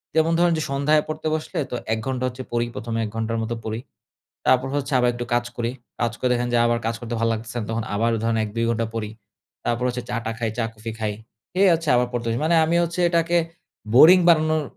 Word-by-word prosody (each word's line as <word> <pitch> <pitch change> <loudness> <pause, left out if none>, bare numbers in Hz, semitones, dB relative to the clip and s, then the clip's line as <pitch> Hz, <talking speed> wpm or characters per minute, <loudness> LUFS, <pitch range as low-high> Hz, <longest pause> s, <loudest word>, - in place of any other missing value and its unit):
যেমন 160 +1 +3
ধরেন 175 -1 +4
যে, - - -1
সন্ধ্যায় 150 +2 +3
পড়তে 155 0 -4
বসলে 160 +3 -5
তো - - -2 0.2
১ 110 - -1
ঘন্টা 130 -1 -2
হচ্ছে 130 +1 -6
পড়ি 120 0 +1
১ম 115 0 -5
এ - - 0
১ - - -5
ঘন্টার 115 0 -1
মতো 120 +1 -3
পড়ি। 110 +1 -3 0.7
তারপর 130 +1 +3
হচ্ছে 140 0 -3
আবার 125 0 +3
একটু 120 0 -4
কাজ 120 0 +2
করি। 120 0 -1 0.3
কাজ 120 -1 +1
করে 130 - 0
দেখেন 120 0 0
যে 120 - +4
আবার 120 0 +2
কাজ 115 - 0
করতে 120 0 -5
ভাল 115 - +2
লাগতেছে 115 +1 -5
না - - -4
তখন 115 0 -2
আবার 115 +3 +1
ধরেন 115 0 +1
১-২ 115 +2 -2
ঘন্টা 115 0 0
পড়ি। 105 -2 -3 0.5
তারপর 120 +1 0
হচ্ছে 125 0 -3
চা-টা 115 -2 -2
খাই, 115 -1 -1
চা-কফি 115 -1 -4
খাই। 105 -1 -1 0.4
খেয়ে 190 +1 +4
হচ্ছে 165 -1 -3
আবার 125 0 +2
পড়তে 120 -1 -3
যাই। 115 - -1
মানে 170 +1 +3
আমি 165 +2 +1
হচ্ছে 170 +2 -3
এটাকে 170 0 +1 0.6
বোরিং 170 +8 +9
বানানোর 155 -2 +4
120 Hz, 230 wpm, -23 LUFS, 115-155 Hz, 0.7 s, বোরিং